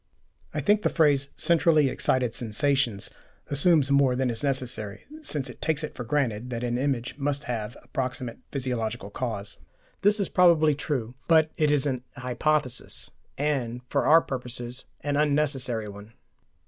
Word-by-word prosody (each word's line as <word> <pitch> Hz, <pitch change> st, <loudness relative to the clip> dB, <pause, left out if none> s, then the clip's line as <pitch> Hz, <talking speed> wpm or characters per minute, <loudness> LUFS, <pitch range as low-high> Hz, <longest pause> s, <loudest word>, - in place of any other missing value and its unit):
I -, -, -2 dB
think 210 Hz, 0 st, +3 dB
the -, -, +2 dB
phrase 145 Hz, -4 st, +3 dB
"centrally 165 Hz, -3 st, +4 dB
excited 125 Hz, -2 st, +1 dB
sensations" 120 Hz, -1 st, 0 dB, 0.4 s
assumes 145 Hz, -1 st, +3 dB
more 140 Hz, -2 st, +4 dB
than 130 Hz, -1 st, +1 dB
is 115 Hz, +2 st, -1 dB
necessary, 125 Hz, -7 st, -2 dB, 0.2 s
since 145 Hz, -, -2 dB
it 125 Hz, -, -11 dB
takes 160 Hz, -1 st, 0 dB
it 155 Hz, -, -4 dB
for 120 Hz, -, -6 dB
granted 125 Hz, -3 st, -1 dB
that 120 Hz, -1 st, -4 dB
an 120 Hz, 0 st, -1 dB
image 130 Hz, -1 st, -2 dB
must 145 Hz, +1 st, -1 dB
have 115 Hz, -3 st, -4 dB
a -, -, -23 dB
proximate 130 Hz, -2 st, -3 dB
physiological 115 Hz, -7 st, -3 dB
cause. 105 Hz, -4 st, -4 dB, 0.4 s
This 205 Hz, +2 st, +3 dB
is 200 Hz, -, +1 dB
probably 165 Hz, -4 st, +5 dB
true, 135 Hz, -5 st, -3 dB
but 160 Hz, -2 st, +5 dB
it 155 Hz, -1 st, +2 dB
is 145 Hz, -2 st, +3 dB
an 130 Hz, -3 st, -1 dB
hypothesis, 125 Hz, +1 st, -1 dB, 0.3 s
and 130 Hz, -5 st, -1 dB
for 140 Hz, -, +1 dB
our 165 Hz, +2 st, +7 dB
purposes 125 Hz, -2 st, -5 dB, 0.2 s
an 145 Hz, 0 st, -1 dB
unnecessary 140 Hz, -6 st, +1 dB
one. 100 Hz, +2 st, -11 dB
135 Hz, 155 wpm, -26 LUFS, 120-150 Hz, 0.4 s, our